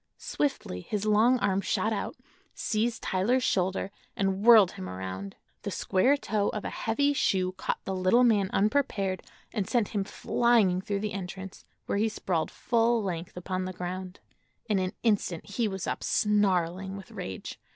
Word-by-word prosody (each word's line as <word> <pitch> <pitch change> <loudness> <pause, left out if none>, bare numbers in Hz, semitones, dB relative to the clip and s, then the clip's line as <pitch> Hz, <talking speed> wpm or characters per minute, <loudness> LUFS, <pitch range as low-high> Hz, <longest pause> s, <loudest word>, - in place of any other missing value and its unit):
Swiftly 270 - -2
his 205 - -3
long 220 +4 +4
arm 195 0 +2
shot 220 +3 0
out, 205 - -3 0.4
seized 225 +2 -1
Tyler's 235 +8 +1
shoulder 190 0 0 0.2
and 195 0 0
whirled 220 -5 +8
him 95 - -7
around. 95 +1 -6 0.3
The - - -4
square 255 +10 +2
toe 210 -5 0
of 210 - -4
a - - -3
heavy 285 +6 +1
shoe 185 -8 +1
caught 185 - -3
the 190 - -2
little 185 +7 +4
man 210 -5 +3
unprepared 200 -4 +1 0.3
and 205 -5 -2
sent 235 -5 +1
him 205 -3 -1
flying 205 -3 +2
through 200 0 -2
the 210 -2 -3
entrance, 190 0 -7 0.2
where 200 - -1
he 220 +1 +2
sprawled 180 -6 -1
full 235 -1 +1
length 175 -2 -4
upon 185 +1 -3
the 185 - -4
ground. 180 +1 -5 0.5
In 210 -4 +1
an 185 +1 -1
instant 205 -7 +1
he 215 +3 -1
was 190 -2 -4
up, - - -3
snarling 190 -2 +1
with 195 - -11
rage. 95 0 -6
195 Hz, 165 wpm, -28 LUFS, 185-220 Hz, 0.5 s, whirled